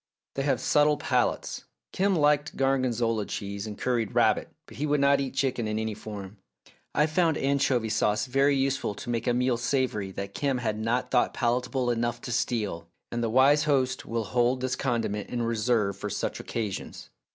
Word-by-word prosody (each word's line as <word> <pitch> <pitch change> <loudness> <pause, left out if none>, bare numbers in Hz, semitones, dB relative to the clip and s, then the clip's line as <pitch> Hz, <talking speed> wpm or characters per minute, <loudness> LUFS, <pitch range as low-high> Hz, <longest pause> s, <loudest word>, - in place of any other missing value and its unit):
They 135 - -2
have 135 -2 +1
subtle 150 0 +3
palates; - - -1 0.3
Kim 195 0 +2
liked 150 -2 +2
gorgonzola 120 -5 +1
cheese 100 +1 -5
and 105 -1 -7
curried 120 -5 -1
rabbit, - - +3 0.2
but - - -14
he 150 +3 -1
would 145 0 +2
not 140 0 +4
eat 135 -1 -4
chicken 130 -5 0
in 105 0 -2
any 110 0 -2
form. 100 -1 -8 0.6
I 150 - +4
found 160 0 +2
anchovy 135 -4 +1
sauce 105 -1 +1
very 135 +2 +3
useful 135 -6 0
to 120 - -8
make 115 +1 -2
a 120 - +3
meal 125 -1 +1
savoury 120 -5 -1
that 100 +1 -5
Kim 140 -3 0
had 110 -3 -2
not 115 +3 -1
thought 120 - +2
palatable 125 +1 0
enough 120 0 -1
to 125 - -6
steal, 110 -8 -1 0.2
and 120 0 -2
the 115 - 0
wise 140 +5 +5
host 130 -3 +1
will 115 0 -1
hold 120 +4 +1
this 130 0 -1
condiment 115 -6 -2
in 120 -1 -2
reserve 115 -3 +1
for 105 - -4
such - - -3
occasions. 105 -4 -5
120 Hz, 185 wpm, -27 LUFS, 110-135 Hz, 0.6 s, wise